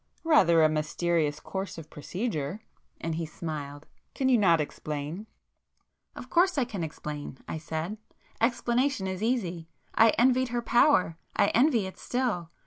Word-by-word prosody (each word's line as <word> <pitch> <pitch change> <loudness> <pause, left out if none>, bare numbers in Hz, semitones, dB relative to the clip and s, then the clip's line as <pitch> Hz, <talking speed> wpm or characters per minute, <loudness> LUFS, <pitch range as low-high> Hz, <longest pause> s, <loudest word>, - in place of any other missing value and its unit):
"Rather 170 - +5
a - - +7
mysterious 155 0 0
course 190 -3 -5
of 160 -1 -10
procedure!" 180 - -4 0.4
and 165 - -3
he 165 +1 -2
smiled; 150 -2 -6 0.3
"Can 265 -1 +1
you 250 - +5
not 170 -5 +4
explain?" 150 +6 -4 0.9
"Of - - -8
course 360 0 +3
I 265 - +2
can 200 -7 -5
explain,"—I 150 -1 -6
said—"Explanation 220 - -2
is 190 0 -3
easy. 180 -9 -1 0.2
I 225 - +6
envied 255 +2 +4
her 240 0 -2
power—I 205 - +2
envy 240 -4 +3
it 190 - -8
still. 235 -10 -1
185 Hz, 135 wpm, -28 LUFS, 160-240 Hz, 0.9 s, a